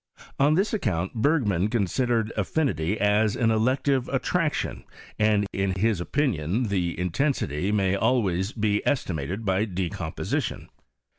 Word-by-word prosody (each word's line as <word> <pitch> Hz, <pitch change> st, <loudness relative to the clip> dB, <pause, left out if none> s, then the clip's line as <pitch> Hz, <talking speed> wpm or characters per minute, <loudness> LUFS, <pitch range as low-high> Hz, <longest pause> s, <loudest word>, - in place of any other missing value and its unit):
On 145 Hz, +3 st, +4 dB
this 195 Hz, +6 st, +1 dB
account 95 Hz, -, -1 dB
Bergman 110 Hz, -, +1 dB
considered 115 Hz, +1 st, 0 dB
affinity 105 Hz, -, 0 dB
as 105 Hz, +1 st, +2 dB
an 115 Hz, -2 st, +2 dB
elective 130 Hz, +4 st, +1 dB
Utlraction, -, -, -1 dB, 0.4 s
and 105 Hz, -1 st, +3 dB
iik 95 Hz, -1 st, -1 dB
his 105 Hz, -2 st, +1 dB
opinion 110 Hz, -, 0 dB
the 90 Hz, -4 st, -1 dB
intensity 90 Hz, -, 0 dB
may 95 Hz, -3 st, +2 dB
al 125 Hz, +4 st, +2 dB
irays 95 Hz, +4 st, -2 dB
be 105 Hz, -1 st, +1 dB
estimated 95 Hz, -, -2 dB
by 95 Hz, +2 st, +1 dB
decomposition. 90 Hz, -4 st, -3 dB
105 Hz, 125 wpm, -25 LUFS, 95-120 Hz, 0.4 s, On